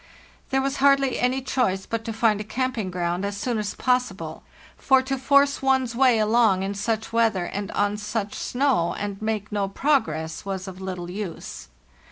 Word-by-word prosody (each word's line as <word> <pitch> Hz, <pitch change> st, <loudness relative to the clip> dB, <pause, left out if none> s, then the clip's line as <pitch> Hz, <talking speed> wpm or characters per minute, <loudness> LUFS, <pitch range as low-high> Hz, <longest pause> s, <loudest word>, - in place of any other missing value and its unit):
There 265 Hz, 0 st, +1 dB
was 275 Hz, +1 st, -1 dB
hardly 275 Hz, -1 st, +3 dB
any 255 Hz, +2 st, +1 dB
choice 220 Hz, -8 st, 0 dB
but 230 Hz, 0 st, -3 dB
to 230 Hz, -, -3 dB
find 220 Hz, -2 st, +2 dB
a -, -, -3 dB
camping 240 Hz, -3 st, -2 dB
ground 175 Hz, 0 st, -2 dB
as 200 Hz, 0 st, -3 dB
soon 230 Hz, +2 st, -1 dB
as 210 Hz, -1 st, -3 dB
possible, 200 Hz, -11 st, -1 dB, 0.3 s
for 265 Hz, -1 st, +3 dB
to 270 Hz, +1 st, -1 dB
force 280 Hz, +2 st, +3 dB
one's 265 Hz, -2 st, +2 dB
way 255 Hz, -2 st, +4 dB
along 215 Hz, -3 st, +3 dB
in 195 Hz, +1 st, -2 dB
such 220 Hz, +2 st, -2 dB
weather 225 Hz, -6 st, +2 dB
and 200 Hz, +2 st, -4 dB
on 205 Hz, 0 st, +1 dB
such 210 Hz, 0 st, -3 dB
snow, 250 Hz, -10 st, 0 dB
and 200 Hz, -1 st, -4 dB
make 215 Hz, -1 st, -2 dB
no 205 Hz, -1 st, 0 dB
progress, 165 Hz, -, 0 dB
was 195 Hz, -1 st, -4 dB
of 190 Hz, 0 st, -8 dB
little 180 Hz, -2 st, -5 dB
use. 180 Hz, -, -6 dB
215 Hz, 180 wpm, -24 LUFS, 195-255 Hz, 0.3 s, way